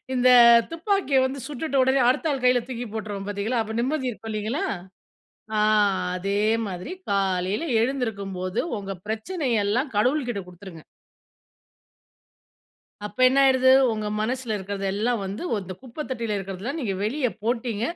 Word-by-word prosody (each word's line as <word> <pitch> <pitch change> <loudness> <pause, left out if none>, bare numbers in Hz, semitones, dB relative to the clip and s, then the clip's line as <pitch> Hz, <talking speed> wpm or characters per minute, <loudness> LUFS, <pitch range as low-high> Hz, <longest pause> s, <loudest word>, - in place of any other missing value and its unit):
இந்த 255 0 +3 0.4
துப்பாக்கிய 335 -5 +1
வந்து 265 +1 -2
சுட்டுட்ட 295 0 -3
உடனே, 265 +1 +3
அடுத்த 285 +5 +1
ஆள் 275 -3 -2
கையில 250 0 +5
தூக்கி 245 -1 -5
போட்டுருவோம் 205 -3 -5
பார்த்தீங்களா. 205 +4 -1
அப்போ 220 0 -6
நிம்மதி 265 +1 -1
இருக்கும் 225 -1 -8
இல்லைங்களா. 215 +7 -2 1.0
ஆ - - +3 0.6
அதே 200 +2 -1 0.3
மாதிரி, 180 - -6 0.2
காலையில 195 - 0 0.2
எழுந்திருக்கும்போது 200 -8 -2 0.2
உங்க 195 -1 -6 0.2
பிரச்சனையெல்லாம் 230 - -1
கடவுள்கிட்ட 245 -1 +1
குடுத்துருங்க. 175 -2 -12 2.2
அப்ப 210 +4 -13
என்ன 265 +2 +1
ஆயிடுது, 260 -1 +5 0.2
உங்க 215 -1 -3
மனசுல 240 +1 -2
இருக்கிறது 195 0 -5
எல்லா 220 +5 0
வந்து 195 +2 -5
வத்த 205 -3 0
இந்த 185 0 -7
குப்பை 260 +4 -7
தொட்டியில 230 -5 -2
இருக்கிறது 195 -1 -6
எல்லாம் 275 +8 -3
நீங்க 210 -8 -2
வெளியே 250 +3 0
போட்டிங்க. 230 -1 -1
225 Hz, 135 wpm, -24 LUFS, 200-260 Hz, 2.2 s, கையில